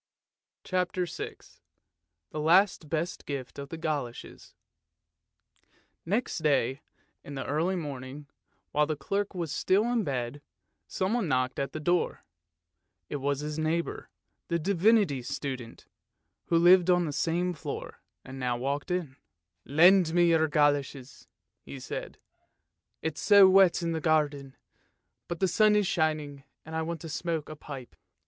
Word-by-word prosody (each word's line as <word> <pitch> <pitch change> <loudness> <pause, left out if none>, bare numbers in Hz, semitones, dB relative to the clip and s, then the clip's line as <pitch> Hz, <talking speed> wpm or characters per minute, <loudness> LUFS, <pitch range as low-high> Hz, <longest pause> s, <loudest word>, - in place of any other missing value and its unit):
" - - -65
CHAPTER 180 0 -1
VI 170 - -6 1.0
THE 155 - -4
LAST 170 0 +3
BEST 165 +3 -2
GIFT 140 -2 -5
OF 140 0 -7
THE 165 - -6
GOLOSHES 145 -7 -5 1.5
Next 215 +4 -1
day 140 -3 +1 0.4
in 145 - -8
the 135 - -4
early 165 +6 0
morning, 140 -3 -6 0.5
while 150 0 +2
the 155 - -1
clerk 195 +8 -3
was 170 -4 -3
still 190 +6 +2
in 235 -3 +1
bed, 130 -2 -3 0.5
someone 195 +2 -1
knocked 130 -2 0
at 140 - -2
the 155 - -4
door. 175 +3 0 0.8
It 145 - -3
was 140 +1 -1
his 150 +1 -4
neighbour, 160 +2 -2 0.4
the 170 - 0
Divinity 190 - +2
Student, 130 -2 -6 0.6
who 170 - +2
lived 175 +1 +6
on 175 -1 +4
the 150 - -4
same 175 +4 0
floor, 155 - -7 0.2
and 135 0 -9
now 125 -1 -1
walked 140 +6 -3
in. 170 -7 -3 0.3
" 85 0 -54
Lend 175 -1 +6
me 175 -1 +5
your 160 -1 +3
goloshes," 145 -3 0 0.3
he 135 - -9
said, - - -6 0.4
" - - -54
it's 160 -2 -3
so 200 -2 +7
wet 190 -2 +5
in 165 - -1
the 160 -1 -2
garden, 145 -4 0 0.7
but 175 -1 -5
the 190 - +2
sun 210 +4 +4
is 210 -1 +3
shining, 155 -6 -1 0.2
and 160 +1 -7
I 160 - 0
want 165 -1 -4
to 165 - -7
smoke 160 0 -3
a 155 - -7
pipe." 140 -4 -9
155 Hz, 150 wpm, -28 LUFS, 140-175 Hz, 1.5 s, so